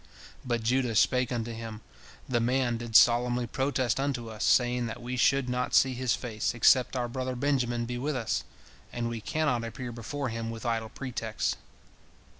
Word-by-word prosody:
But 120 -2 -1
Judah 125 0 +1
spake 125 +3 +3
unto 120 -1 -2
him, 115 -1 -7 0.5
"The 120 -2 +1
man 120 0 +1
did 115 -1 -7
solemnly 120 +1 +5
protest 130 -1 0
unto 125 -5 -2
us, 110 0 -5
saying 125 -1 +3
that 110 - -6
we 125 +1 -4
should 135 +1 +3
not 125 0 -1
see 130 -1 +5
his 125 -1 0
face, 115 -1 -3
except 125 +2 +4
our 125 -1 -1
brother 130 +1 -3
Benjamin 120 -3 0
be 120 +1 -4
with 145 +3 -2
us, 115 -3 -1 0.5
and 120 -1 -2
we 115 -1 -5
cannot 145 -2 0
appear 120 +2 -6
before 130 +4 -4
him 115 0 -4
with 115 +1 -7
idle 115 -1 -1
pretexts." 115 -4 -3
120 Hz, 175 wpm, -29 LUFS, 115-130 Hz, 0.5 s, solemnly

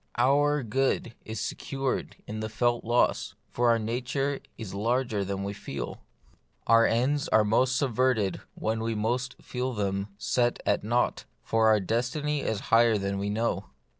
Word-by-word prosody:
Our 145 +3 +3
good 120 +1 0
is 110 0 -5
secured 135 -1 -3
in 110 +1 -5
the 110 0 -3
felt 120 +2 +1
loss; 120 +2 +1 0.2
for 120 0 +2
our 115 - +5
nature 130 +5 -2 0.2
is 110 -5 -7
larger 115 0 0
than 100 0 -3
we 100 +1 -3
feel: 105 - -6 0.6
our 115 0 +6
ends 135 +5 +1
are 110 - +4
most 130 +5 +2
subserved 125 -6 +1 0.2
when 110 +1 -1 0.2
most 125 +4 -1
we - - -22
feel 125 +1 -3
them 100 -2 -1
set 120 +3 +1
at 100 - +1
naught, 120 +3 0 0.2
for 115 0 +2
our 110 -1 +5
destiny 125 - -1
is 110 -5 -1
higher 115 -1 +6
than 100 0 -2
we 100 +1 -2
know. 105 -2 -1
115 Hz, 160 wpm, -28 LUFS, 105-130 Hz, 0.6 s, our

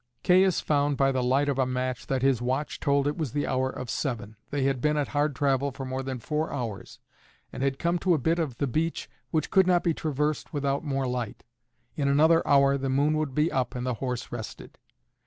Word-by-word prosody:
Caius 185 0 +4
found 145 -1 +1
by 135 0 +3
the 130 -1 0
light 130 +3 +2
of 140 -2 0
a 130 - +3
match 125 -1 -3
that 130 -1 -1
his 135 -3 +3
watch 130 +4 -2
told 140 -2 +2
it 145 +3 -2
was 150 -7 -2
the 145 0 0
hour 130 0 0
of 125 - -6
seven; 110 -5 -3
they 145 -2 -1
had 135 -2 0
been 150 0 +2
at 145 - -1
hard 145 -1 0
travel 140 0 +1
for 135 0 -7
more 130 +1 -3
than 130 -1 -4
four 150 +6 -2
hours, 110 -8 -5 0.6
and - - -6
had 135 0 0
come 170 +3 0
to 180 -1 +3
a - - +1
bit 165 +5 +1
of 140 -8 -2
the 140 - 0
beach 155 +6 -1 0.2
which 155 - -1
could 190 -1 +5
not 175 -1 +3
be 170 - +2
traversed 150 -1 -2
without 140 0 -1
more 135 -3 -1
light. 125 -4 -4 0.5
In 140 -2 0
another 160 +4 +5
hour 140 -1 +4
the 135 0 -2
moon 145 +3 +2
would 150 -4 -2
be 150 +3 +2
up 130 -2 -1
and 125 0 -3
the 125 - 0
horse 125 -2 -3
rested. 110 -2 -8
140 Hz, 230 wpm, -27 LUFS, 130-150 Hz, 0.6 s, could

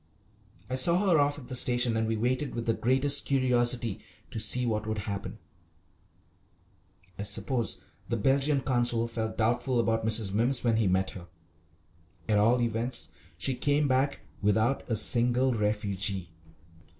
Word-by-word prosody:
I 130 - -6
saw 170 +7 +3
her 160 - +5
off 145 0 +1
at 130 -4 -11
the 130 - -7
station, 120 -2 +2
and 110 0 0
we 110 0 -1
waited 125 +4 -1
with 115 -1 -3
the 115 - +2
greatest 135 +5 +2
curiosity 120 -5 +1 0.3
to 115 - -4
see 125 +3 +1
what 110 -2 -2
would 110 0 -2
happen. 100 -1 -5 1.8
I - - -2
suppose 110 +4 -1 0.3
the 115 - 0
Belgian 135 +5 +2
Consul 120 -3 +1
felt 110 -1 -4
doubtful 120 +2 +1
about 115 -1 +1
Mrs. 110 -2 +1
Mimms 120 +5 0
when 115 -2 +2
he 110 -3 +2
met 95 +1 +1
her. 90 -2 -10 1.0
At 105 -1 +3
all 120 +4 +3
events 115 +2 -1 0.3
she 110 +9 -1
came 145 +3 +1
back 135 +2 0 0.2
without 110 +6 +2
a 115 - +1
single 125 +3 +2
refugee. 100 -4 -2
120 Hz, 150 wpm, -28 LUFS, 110-130 Hz, 1.8 s, her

